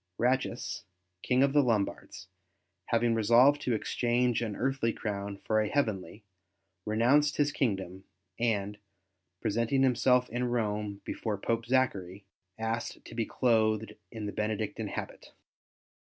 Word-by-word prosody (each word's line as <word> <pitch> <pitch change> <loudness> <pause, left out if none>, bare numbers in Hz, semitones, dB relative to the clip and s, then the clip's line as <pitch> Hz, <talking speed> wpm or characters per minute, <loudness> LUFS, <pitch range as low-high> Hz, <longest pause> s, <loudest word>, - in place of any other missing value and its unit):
Ratchis, 125 -1 -1 0.4
King 125 +1 +2
of 140 0 +2
the 145 - +6
Lombards, 105 -6 -2 0.6
having 115 0 +2
resolved 120 +6 +5
to 125 - 0
exchange 120 +2 0
an 110 -3 -3
earthly 130 -2 0
crown 100 -2 -4
for 110 0 +2
a 105 - -1
heavenly, 105 - -2 0.6
renounced 130 +8 +3
his 145 -1 +2
kingdom 95 -8 -2 0.3
and, 105 -3 0 0.6
presenting 115 +5 +1
himself 125 0 +3
in 120 +2 -1
Rome 105 -4 -2
before 110 -3 -3
Pope 115 +3 -2
Zachary, 100 -7 0 0.3
asked 115 +1 -3
to - - -11
be 115 -1 -2
clothed 110 -3 +1 0.2
in 110 -2 -6
the 105 - -3
Bene 105 0 -1
dictine - - -4
habit. - - -7
115 Hz, 130 wpm, -30 LUFS, 105-125 Hz, 0.6 s, the